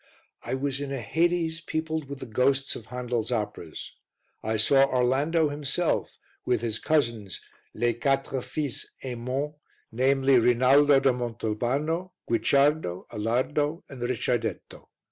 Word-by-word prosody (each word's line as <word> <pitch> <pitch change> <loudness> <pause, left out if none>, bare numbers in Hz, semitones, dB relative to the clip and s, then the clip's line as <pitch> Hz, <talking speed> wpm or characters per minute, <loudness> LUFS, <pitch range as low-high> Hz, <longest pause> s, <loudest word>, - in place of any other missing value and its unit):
I - - -3
was 140 +1 -2
in 140 -1 -4
a 135 - -2
hades 165 +6 0
peopled 160 -2 -3
with 140 -1 -7
the - - -4
ghosts 135 +4 +1
of 110 - -9
Handel's 125 -2 -3
operas. 105 -8 -4 0.5
I 110 +1 -1
saw 135 +5 +5
Orlando 140 +6 +2
himself 145 +4 -1 0.3
and 125 - +2
his 115 -1 -2
cousins 115 - 0 0.4
"Les 120 +1 +1
quatre 135 +2 0
fils 145 -1 -3 0.2
Aymon," 130 +3 -3 0.4
namely 135 +2 +3
Rinaldo 135 +4 +5
da 135 0 +3
Montalbano, 125 - -2
Guicciardo, 140 - +2
Alardo, 145 - -1
and 130 -3 -9
Ricciardetto. 120 -1 -2
130 Hz, 125 wpm, -27 LUFS, 120-145 Hz, 0.5 s, saw